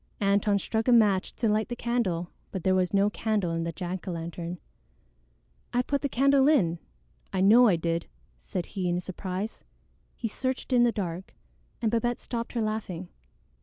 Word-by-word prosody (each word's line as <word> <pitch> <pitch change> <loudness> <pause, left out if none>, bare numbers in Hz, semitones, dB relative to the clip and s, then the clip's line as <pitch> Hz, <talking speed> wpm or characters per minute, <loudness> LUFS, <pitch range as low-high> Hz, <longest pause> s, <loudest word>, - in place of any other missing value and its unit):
Antone 200 0 +3
struck 220 +4 -1
a - - +5
match 210 -5 +4
to 230 - 0
light 215 +2 +1
the 240 - -3
candle, 220 -9 -1 0.2
but 190 -4 -4
there 190 - +3
was 185 -1 +2
no 200 0 +3
candle 210 -6 0
in 165 0 -1
the 170 - -2
jack 180 +3 -5
o' - - -1
lantern. 170 +1 -5 1.2
"I 245 +1 +2
put 280 +2 -1
the 280 - -1
candle 275 +2 +4
in; 175 - +3 0.5
I 190 - -1
know 230 +6 +7
I 195 - +4
did," 165 0 -1 0.3
said 170 - -4
he 185 -3 -3
in 175 0 +1
surprise. 185 +3 -5 0.5
He 230 - -3
searched 260 +4 -3
in 245 - +5
the 240 -1 +5
dark, 185 -3 -5 0.5
and 220 - +2
Babette 235 +1 0
stopped 235 -1 -4
her 235 - 0
laughing. 195 -5 -3
200 Hz, 180 wpm, -28 LUFS, 180-235 Hz, 1.2 s, know